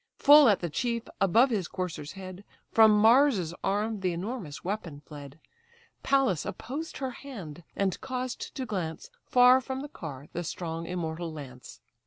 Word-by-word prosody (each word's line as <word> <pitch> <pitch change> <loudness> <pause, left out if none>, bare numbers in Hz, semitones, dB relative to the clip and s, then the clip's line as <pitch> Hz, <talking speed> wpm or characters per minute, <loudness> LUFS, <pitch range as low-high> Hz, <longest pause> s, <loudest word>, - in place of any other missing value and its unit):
Full 290 -2 +8
at 205 - +2
the 175 - -2
chief, 235 - -1 0.2
above 225 +7 +4
his 195 -7 -1
courser's 175 -5 -5
head, 190 0 -9 0.3
From 220 -1 +7
Mars's 220 - +4
arm 210 +2 -1
the 185 -2 -1
enormous 180 - -5
weapon 175 -6 -4
fled: 145 0 -11 0.6
Pallas 270 - +2
opposed 300 +6 -6
her 265 -2 -3
hand, 200 - -9
and 195 -2 -1
caused 255 -1 -5
to 265 - -3
glance 180 -8 -5 0.2
Far 250 +1 +6
from 265 +1 -5
the 290 - -6
car 145 - -8
the 175 - -3
strong 165 0 -5
immortal 170 -1 -4
lance. 130 -5 -10
195 Hz, 155 wpm, -28 LUFS, 165-250 Hz, 0.6 s, Full